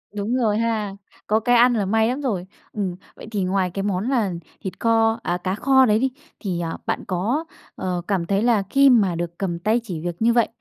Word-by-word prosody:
Đúng 210 +4 -1
rồi 215 -4 +1
ha. 220 -3 -1 0.3
Có 215 +1 +3
cái 245 +2 +2
ăn 245 +1 +6
là 205 -4 0
may 220 +3 +2
lắm 255 +4 -2
rồi. 205 -10 -2 0.3
Ừm, 195 -4 -2 0.2
vậy - - -11
thì 200 -3 -1
ngoài 185 -1 0
cái 195 +3 -3
món 200 +3 -1
là 230 -8 +1 0.3
thịt 190 - -6
kho, 225 0 +2
à, 175 - -1
cá 185 +2 -2
kho 265 +2 +4
đấy 215 -1 +3
đi, 265 0 +1 0.3
thì, 180 -5 -3
à, 165 -1 -3
bạn - - -2
có, 220 - -1 0.3
ờ, 180 -1 -2
cảm 190 -4 0
thấy 200 +4 +1
là 230 -4 +3
khi 275 +4 +5
mà 205 -8 +4
được 170 0 -4
cầm 175 -4 -2
tay 215 +6 +2
chỉ 180 -8 -5
việc 175 +1 -4
như 235 +1 +4
vậy, 235 -1 +3
210 Hz, 230 wpm, -22 LUFS, 185-235 Hz, 0.3 s, ăn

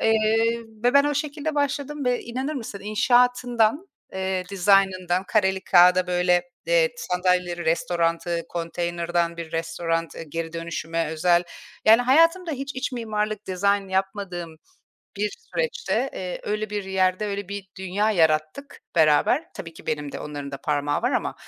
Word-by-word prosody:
Eee, 225 +1 +2 0.3
ve 245 - +3
ben 280 0 +7
o 290 0 0
şekilde 295 +1 -3
başladım 285 0 -1
ve 250 -1 +1
inanır 260 +6 -4
mısın 225 -7 -6
inşaatından, 245 - +2 0.3
eee, 190 -1 -2
dizaynından 190 -1 +2
kareli 190 -2 +1
kâğıda, 180 0 +6
böyle, 180 0 +2 0.2
eee, - - +4
sandalyeleri, 180 - 0
restoranı, 170 -1 0
konteynerdan 170 0 -2
bir 165 -1 -7
restoran, 165 0 -2
eee, - - -7
geri 165 +2 -4
dönüşüme 165 0 -3
özel, 170 +2 +3 0.4
yani, 225 +3 +7
hayatımda 330 +7 +4
hiç 275 0 -5
iç 260 +1 -3
mimarlık 215 -3 -3
dizayn 200 +1 +1
yapmadığım 190 -3 -3 0.6
bir 210 +1 -1
süreçte, 470 - -2
eee, 180 -1 -5
öyle 215 0 -3
bir 205 -2 -3
yerde 190 +1 +1
öyle 200 -1 -4
bir 200 -1 -6
dünya 195 +3 0
yarattık 160 - 0 0.2
beraber. 155 - +4
Tabii 165 -1 -8
ki - - -15
benim 150 -2 -3
de - - -6
onların 145 -1 -6
da 140 - -5
parmağı 145 -1 -1
var - - +1
ama. - - -1
190 Hz, 145 wpm, -24 LUFS, 170-235 Hz, 0.6 s, ben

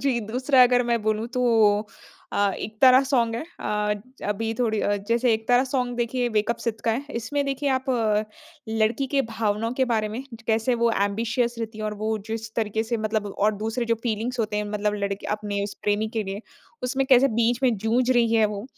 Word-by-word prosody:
जी, 255 -4 +1
दूसरा 255 +4 +3
अगर 245 0 +4
मैं 235 -1 +1
बोलूँ, 215 +1 0
तो 250 0 -1 0.9
अ, 200 -1 +2
इकतारा 255 +5 +4
सॉन्ग 235 -4 +1
है। 235 - -3 0.2
अ, 210 0 0 0.3
अभी 220 +2 -1
थोड़ी 220 -3 +1
अ, 205 0 +1
जैसे 235 +1 +3
इकतारा 245 +4 +2
सॉन्ग, 250 -2 -2
देखिए, 245 +1 0
वेक 215 +2 +2
अप 235 - 0
सिड 225 -1 -2
का 230 - +3
है। 240 +5 -1 0.2
इसमें 285 +5 -2
देखिए, 275 +1 -1
आप 260 - -5 0.8
लड़की 225 +4 +1
के 275 - +4
भावनाओं 220 +1 -1
के - - +5
बारे 215 -1 +1
में, 230 +5 -5 0.2
कैसे 225 +2 +2
वो 235 - +4
ऐम्बिशियस 225 +4 0
रहती 220 -1 -5
हैं, 215 - -4
और 210 0 -2
वो 220 0 0
जिस 220 0 -5
तरीके 220 -1 -1
से 230 +1 -2
मतलब 215 -1 -1
और 210 +1 +2
दूसरे, 225 +2 -1
जो 230 0 +1
फ़ीलिंग्स 235 +2 -2
होते 215 -1 -1
हैं, 210 - -1
मतलब 210 0 -1
लड़के 200 -1 -3
अपने 205 -1 -3
उस 200 - -6
प्रेमी 210 +1 +1
के 215 - +1
लिए, 195 +1 -5 0.4
उसमें 265 +2 0
कैसे 265 0 +6
बीच 235 +1 +2
में 245 -4 +3
जूझ 230 +5 +1
रही 235 -2 +3
है 220 -1 +5
वो, 200 +2 -6
225 Hz, 205 wpm, -24 LUFS, 215-245 Hz, 0.9 s, कैसे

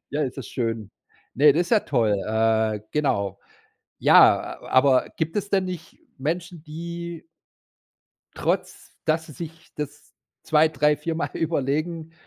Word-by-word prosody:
Ja, 150 +1 -1
ist 130 -3 -3
das 120 - -6
schön. 115 -4 -3 0.4
Ne, 145 +2 +6
das 170 +4 +2
ist 175 - -8
ja 220 -3 +5
toll, 115 -7 +1
äh, 110 -1 +1
genau. 100 -10 0 0.6
Ja, - - +5
a - - -12
aber 130 0 +4
gibt 160 +2 -2
es 205 -1 -1
denn 190 -1 +2
nicht 180 -3 -7 0.2
Menschen, 165 +3 -3
die 170 +1 -7 1.1
trotz, - - -2
dass 160 +1 +1
sie 150 - -11
sich 165 +2 -10
das 145 0 -7 0.3
2, 155 0 +4
3, 150 -1 +2
4 160 +2 -3
Mal 165 - -2
überlegen, 160 +1 -1
150 Hz, 145 wpm, -24 LUFS, 130-165 Hz, 1.1 s, Ne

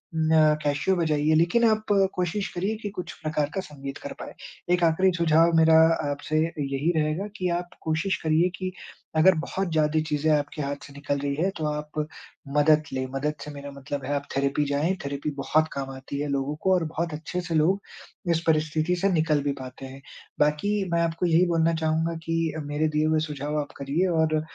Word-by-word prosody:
म 155 -1 +4
कैसीओ 145 +6 +1
बजाइए 155 -2 +2
लेकिन 175 +9 +3
आप 215 0 0 0.3
कोशिश 185 +3 -1
करिए 195 +5 -1
कि 205 - -3
कुछ 180 -2 -5
प्रकार 155 -2 -1
का 190 - -1
संगीत 140 -4 -8
कर - - -7
पाएँ। - - -7 0.4
एक 175 - +2
आख़िरी 175 +3 +4
सुझाव 165 0 +4
मेरा 160 0 +6 0.3
आपसे 145 +2 -2
यही 145 -1 -1
रहेगा 155 +6 -1
कि 180 -1 -1
आप 175 0 -6
कोशिश 160 +5 0
करिए 160 +3 +3
कि 185 -1 -3 0.5
अगर 180 +3 +6
बहुत 185 +2 -3
ज़्यादा 155 0 +2
चीज़ें 150 +1 +1
आपके 150 0 0
हाथ 140 0 -2
से 140 - -14
निकल 140 0 -2
रही 140 0 -2
हैं 180 +6 +1
तो 155 - -2
आप 150 0 -3 0.5
मदद 155 +1 +5
लें। 130 0 -1
मदद 145 +3 -1
से 150 - -7
मेरा 140 0 -8
मतलब 140 0 -6
है 145 - -2
आप 140 0 -3
थेरेपी 140 +2 +1
जाए 145 +6 +1
थेरेपी 140 +1 -3
बहुत 155 +3 +2
काम 135 -1 -4
आती 135 +1 -6
है 150 - -2
लोगों 140 +1 -1
को 190 0 +4
और 180 - +2
बहुत 165 +1 -3
अच्छे 160 +4 -4
से 170 -2 -3
लोग 175 +6 +3 0.5
इस 165 -1 +1
परिस्थिति 155 +2 +2
से 195 - +3
निकल 155 -3 +2
भी 145 - 0
पाते 130 +1 -8
हैं। 135 +1 -10 0.4
बाकी 150 +8 +2 0.2
मैं 170 - +3
आपको 165 +1 0
यही 170 +1 +4
बोलना 165 -1 +2
चाहूँगा 160 +1 +1
कि 165 -1 -1
मेरे 145 +2 0
दिए 155 - +3
हुए 155 0 +2
सुझाव 150 +1 -3
आप 145 - -8
करिए 145 +7 0
और 155 -1 +2
155 Hz, 200 wpm, -26 LUFS, 145-170 Hz, 0.5 s, मेरा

